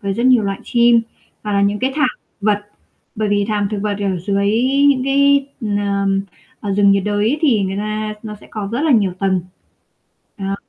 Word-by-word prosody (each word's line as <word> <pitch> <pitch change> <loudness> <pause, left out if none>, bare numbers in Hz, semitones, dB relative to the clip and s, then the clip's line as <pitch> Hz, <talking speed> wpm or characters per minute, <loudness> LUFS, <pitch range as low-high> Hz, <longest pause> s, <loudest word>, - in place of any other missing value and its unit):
với 200 -1 -1
rất 235 +3 0
nhiều 250 -3 +5
loại 195 -1 -3
chim, 235 -1 +4 0.4
hoặc 210 - -3
là 200 0 +2
những 205 +1 +1
cái 260 +1 -1
thảm 300 0 +2 0.3
vật, 205 0 +2 0.6
bởi 215 -1 -1
vì 205 0 +1
thảm 205 -2 0
thực 210 - -2
vật 205 -1 -1
ở 195 -3 -1
dưới 200 +2 -1 0.4
những 260 -2 +2
cái, 280 0 +3 0.2
ờm, 200 -2 0 0.4
ở 205 -2 -3
rừng 200 0 +4
nhiệt 195 -1 +1
đới 210 +7 0
thì 235 -10 +3
người 190 0 -2
ta 215 +1 -3
nó 215 -2 -7
sẽ - - -15
có 205 -2 -4
rất 240 - -1
là 315 - +2
nhiều 200 -6 +3
tầng. 190 -2 +1 1.0
À. 195 0 -3
205 Hz, 200 wpm, -18 LUFS, 200-235 Hz, 1.0 s, nhiều